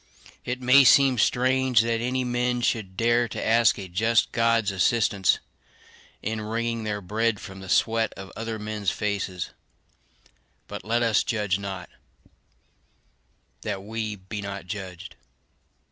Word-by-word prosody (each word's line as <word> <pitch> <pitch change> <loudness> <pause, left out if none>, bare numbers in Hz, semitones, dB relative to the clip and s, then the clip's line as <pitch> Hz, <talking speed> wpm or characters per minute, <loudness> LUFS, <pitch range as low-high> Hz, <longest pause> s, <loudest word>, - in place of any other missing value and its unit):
It 125 +1 -4
may 130 +3 +7
seem 135 -1 +5
strange 130 0 +3
that 115 0 -1
any 125 +2 -1
men 125 0 0
should 100 -6 -1
dare 120 +1 +2
to 105 - -5
ask 115 0 +4
a 95 -2 -6
just 110 +6 +1
God's 115 -2 +2
assistance 100 -1 +2 0.9
in 110 +1 -2
wringing 115 +1 -2
their 105 -1 -2
bread 110 +3 0
from 95 0 -9
the 95 -1 -10
sweat 115 +2 +2
of 95 0 -9
other 115 0 -4
men's 105 -2 -2
faces; 100 -4 -3 1.2
but - - -7
let 115 +2 +1
us 115 -2 +3
judge 105 -5 -1
not, 95 -3 -6 1.7
that 95 - -4
we 110 0 -4
be 100 +2 -7
not 100 -1 -6
judged. 95 -3 -7
110 Hz, 135 wpm, -25 LUFS, 100-115 Hz, 1.7 s, may